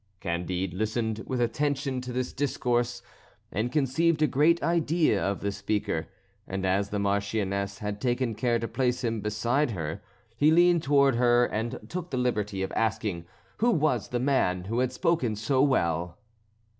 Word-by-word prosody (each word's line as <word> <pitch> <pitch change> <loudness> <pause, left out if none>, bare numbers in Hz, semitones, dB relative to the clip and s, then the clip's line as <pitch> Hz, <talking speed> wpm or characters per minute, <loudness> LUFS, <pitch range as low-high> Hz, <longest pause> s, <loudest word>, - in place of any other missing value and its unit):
Candide 90 +1 -2
listened 110 +2 -2
with 130 -2 -2
attention 135 +1 -1
to 125 0 -6
this 125 0 -3
discourse, 120 -3 -1 0.5
and 115 +4 -1
conceived 155 +3 +2
a - - +7
great 155 +5 +3
idea 165 - +2
of 100 0 -1
the 100 - -1
speaker, 100 -4 -2 0.4
and 95 0 -3
as 100 +2 +1
the 105 - -2
Marchioness 100 0 -1
had 105 0 -5
taken 125 -1 0
care 120 +2 +1
to 115 - -3
place 125 0 -1
him 115 -2 -1
beside 120 +7 0
her, 90 -2 -4 0.3
he 145 +6 +4
leaned 175 +1 +5
towards 140 -3 +3
her 120 0 +4
and 115 +1 -3
took 180 -1 -5
the 130 - -3
liberty 105 -6 -1
of 95 - -4
asking 110 -6 -1 0.3
who 235 - +2
was 150 - +1
the 120 - -2
man 120 -9 +1
who 115 +6 -2
had 125 0 +1
spoken 165 - 0
so 120 +5 +1
well. 85 - +1
120 Hz, 165 wpm, -27 LUFS, 100-135 Hz, 0.5 s, a